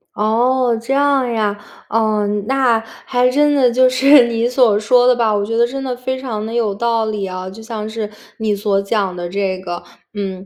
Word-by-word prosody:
哦， 240 +3 +1
这 260 +4 -2
样 280 -2 +2
呀。 210 -3 0 0.3
嗯， 210 -2 0
那 260 -4 +2 0.3
还 250 0 +2
真 295 +3 +2
的 260 -4 +3
就 255 +2 +4
是 260 0 +5
你 230 0 0
所 245 -4 +3
说 245 +3 +3
的 250 - +5
吧， 230 -2 +1
我 200 0 -1
觉 225 +2 -3
得 235 - +4
真 270 +2 -5
的 255 -2 -3
非 260 +1 -4
常 225 -5 -4
地 225 - -6
有 230 -4 0
道 230 +1 0
理 210 -2 -3
啊， 185 0 -6
就 205 +4 -11
像 220 -1 -6
是 220 -1 -5 0.3
你 220 -2 -1
所 200 -1 0
讲 200 -2 -1
的 175 -1 -5
这 190 0 -2
个， 175 -2 -6 0.3
嗯， 190 -2 -5
225 Hz, 220 characters per minute, -17 LUFS, 205-250 Hz, 0.3 s, 是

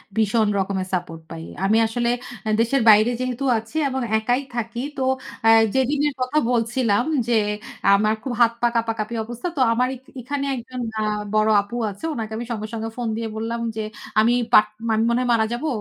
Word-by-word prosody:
ভীষণ 220 0 +2
রকমের 190 -1 -2
সাপোর্ট 170 -3 -3
পাই। 165 0 -7 0.2
আমি 215 +3 +3
আসলে 235 +1 -1 0.4
আ - - +1
দেশের 245 +4 +2
বাইরে 215 +3 +6
যেহেতু 255 +1 -3
আছি 225 +5 -8
এবং 265 0 -2 0.2
একাই 245 +4 0
থাকি। 235 +1 -3 0.2
তো 265 - 0 0.4
আ - - +8 0.3
যেদিনের 285 +3 +1
কথা 255 +4 0
বলছিলাম 235 -2 +1 0.2
যে, 240 - +1 0.6
আমার 215 +2 +3
খুব 260 - -3
হাত-পা 235 +1 +3
কাঁপাকাঁপি 225 0 -1
অবস্থা। 240 +8 -5
তো - - +1
আমার 250 +2 +2
এক 255 - -14 0.2
এখানে 275 +3 -3
আ - - 0
একজন 250 +1 -7 0.5
বড় 215 0 +3
আপু 200 +4 -9 0.2
আছে। 200 +11 -8
উনাকে 225 -5 -5
আমি 235 - -4
সঙ্গে, 215 -2 -3
সঙ্গে 225 0 -3
ফোন 240 -1 -2
দিয়ে 230 0 -3
বললাম 230 +1 -3
যে 220 - -2 0.4
আমি 225 +2 +4 0.2
বা - - +11 0.5
মনে 235 +1 +2
হয় 250 - -1
মারা 220 -1 +3
যাবো। 245 +7 -3
230 Hz, 180 wpm, -22 LUFS, 220-245 Hz, 0.6 s, বা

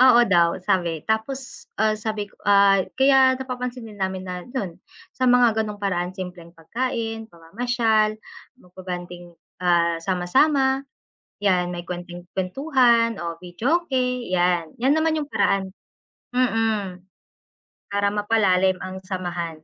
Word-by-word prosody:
oo 255 -2 +7
daw 170 -1 +3
sabi 175 -3 0
tapos 255 +4 -3 0.2
ah, 215 0 +3
sabi 215 -1 -4
ko - - -26
ah, 200 -1 +5 0.2
kaya 265 -1 +5
napapansinin 250 -4 -5
namin 190 -1 -3
na 180 -1 -5
yun, 195 -11 -4 0.4
sa 260 - 0
mga 245 -3 +4
ganong 210 -1 -7
paraan 180 -2 -1
simpleng 180 -3 -8
pagkain, 225 +5 -3
pamamasyal, 215 +4 0 0.4
magba-bonding, 175 -1 -8 0.3
ah, 170 -1 +3
sama-sama. 265 - +2 0.6
Yan 180 -3 +1
may 175 -1 -7
konting 175 0 -7
kwentuhan 235 - +2
o 170 -3 -5
videoke 260 - -1 0.3
yan, 175 -2 0
yan 260 +4 +1
naman 315 0 +1
yung 290 - -13
paraan 190 -1 +1 0.6
mm 225 -6 0 0.9
para 200 0 +1
mapalalim 200 -3 +2
ang 185 0 -6
samahan. 175 -4 -5
200 Hz, 120 wpm, -23 LUFS, 180-240 Hz, 0.9 s, oo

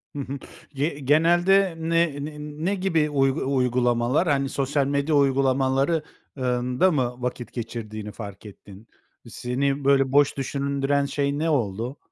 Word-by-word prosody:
Hı - - -4
hı. 140 +1 -4 0.4
Ye 145 +2 -2
genelde 175 +6 +3
ne 165 -3 0
ne 150 -1 -8
ne 150 +6 -3
gibi 165 -5 +1
uy 135 -2 +2 0.2
uygulamalar? 125 +3 +1
Hani, 140 -2 +1
sosyal 140 0 0
medya 140 +2 0
uygulamaları 135 +2 +2 0.3
ııı, 125 -1 0
ında 125 +9 +2
mı 125 -4 0
vakit 125 -1 -5
geçirdiğini 110 -3 -6
fark 100 -1 -9
ettin? 100 +1 -13 0.4
Seni 135 +3 -2
böyle 135 -1 +3
boş 145 0 +3
düşündüren 140 +1 -1
şey 140 +1 -1
ne 165 +1 0
oldu? 120 -1 -1
140 Hz, 140 wpm, -24 LUFS, 125-150 Hz, 0.4 s, genelde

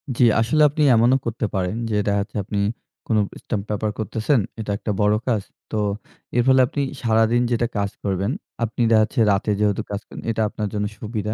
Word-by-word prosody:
জি, 125 - +3 0.2
আসলে 125 +7 +2
আপনি 150 +1 0
এমনও 120 +4 +4
করতে 115 -1 -2
পারেন 90 +1 -1
যে 105 - -1
দেখাচ্ছে 100 +1 -1
আপনি 100 +1 -3 0.5
কোনো 110 -2 +2 0.2
স্টাম্প 105 -4 -2
পেপার 105 0 -1
করতেছেন। 110 +5 +1 0.2
এটা 105 -2 -3
একটা 105 - -3
বড় 105 +1 +4
কাজ। 115 -5 +2 0.3
তো 110 - -1 0.6
এর 120 - +4
ফলে 130 0 +6
আপনি 145 - -3 0.2
সারাদিন 115 +1 +3
যেটা 120 0 +1
কাজ 100 0 0
করবেন, 100 +3 0 0.3
আপনি 115 +1 -2
দেখা 110 - +6
যাচ্ছে 115 +3 -3
রাতে 100 +2 0
যেহেতু 105 -2 +1
কাজ 100 0 -3
করেন - - -9
এটা 110 - -1
আপনার 105 -1 -3
জন্য 105 0 -1
সুবিধা। 110 -1 -3
110 Hz, 190 wpm, -22 LUFS, 105-115 Hz, 0.6 s, ফলে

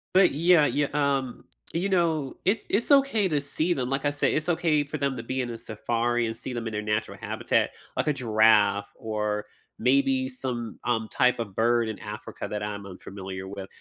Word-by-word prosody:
But, 190 -1 +6
yeah, 165 +1 +5
y 145 - +1
um, 140 -3 0 0.3
you 175 +4 0
know, 165 -7 +1
it's 200 +4 +1
it's 230 +8 +1
okay 275 -8 +4
to 150 -2 +1
see 155 +5 0
them. 125 -3 -2
Like 135 +1 -1
I 145 - +4
said, 145 - +1
it's 155 +3 -1
okay 160 -3 +2
for 145 +2 -5
them 140 -2 -1
to 115 - -5
be 130 +2 -2
in 125 - -3
a 115 - -6
safari 120 +2 -1
and 115 - -4
see 130 - -6
them 115 -1 -3
in 110 - -5
their 105 - -1
natural 105 +1 -2
habitat, - - 0 0.3
like - - -1
a 150 - +3
giraffe 110 -4 +3
or 105 -1 -2 0.3
maybe 130 +1 +2
some, 125 -3 -4
um, 115 -2 0
type 125 -1 +3
of 105 -5 -5
bird 120 0 +2
in 110 - -5
Africa 105 -1 -7
that 105 0 -4
I'm 105 -1 -4
unfamiliar 95 0 -7
with. 95 -1 -7
125 Hz, 205 wpm, -26 LUFS, 110-145 Hz, 0.3 s, But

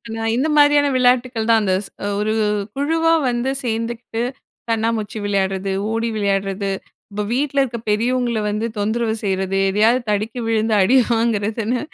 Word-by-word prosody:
நான் 225 0 -1
இந்த 270 +5 +1
மாரியான 290 0 +5
விளையாட்டுக்கள் 250 -2 +2
தான், 225 -1 +5
அந்த 190 -2 +1
ஸ் - - -9 0.3
ஒரு 215 +1 0 0.4
குழுவா 325 +4 +2 0.2
வந்து 240 +2 -1
சேந்துகிட்டு, 230 0 -3 0.5
கண்ணாமூச்சி 225 -1 -1
விளையாடுறது, 195 -1 -1 0.2
ஓடி 225 +1 -1
விளையாடுறது. 200 -1 -1 0.4
இப்போ 210 +1 -3
வீட்ல 280 +2 +1
இருக்க 240 -3 -4
பெரியவங்கள 235 +2 +1
வந்து 210 +2 -2
தொந்தரவு 220 +2 0
செய்றது, 190 -1 -1
எதையாவது 220 +6 +3
தடுக்கி 215 +4 -1
விழுந்து 220 -1 +1
அடி 225 +8 +4 0.2
வாங்குறதுன்னு 225 +1 0
225 Hz, 135 wpm, -20 LUFS, 210-245 Hz, 0.5 s, மாரியான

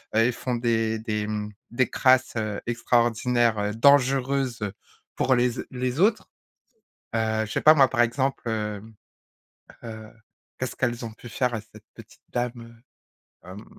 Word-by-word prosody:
heu, - - +4
et 120 - +2
font 125 +1 -3
des 115 -2 0
des, 105 -1 -2
mmh 105 0 -4 0.2
des 120 0 +1
crasses, 130 -1 +3
heu, 110 -2 -2
extraordinaires, 120 -1 +1
heu, 105 0 -1
dangereuses, 135 0 +3
heu, 105 -2 -3 0.4
pour 130 - +2
les 125 0 +2 0.2
les 125 +3 -3
autres. 215 +3 +2 0.9
Heu, 110 -1 0
je - - -11
sais - - 0
pas 155 +1 +7
moi? 135 -3 +5
Par 120 - 0
exemple, 130 +3 0
heu 105 -2 -2 1.0
heu, 110 -1 -8 0.5
qu'est-ce 130 - -4
qu'elles 120 -1 -1
ont 115 - -6
pu 120 - -12
faire 125 +2 -1
à 110 - -2
cette 110 - -17
petite - - -16
dame? 120 -1 -5 0.6
Heu 90 - -11
hem 100 +4 -10
120 Hz, 160 wpm, -25 LUFS, 110-125 Hz, 1.0 s, pas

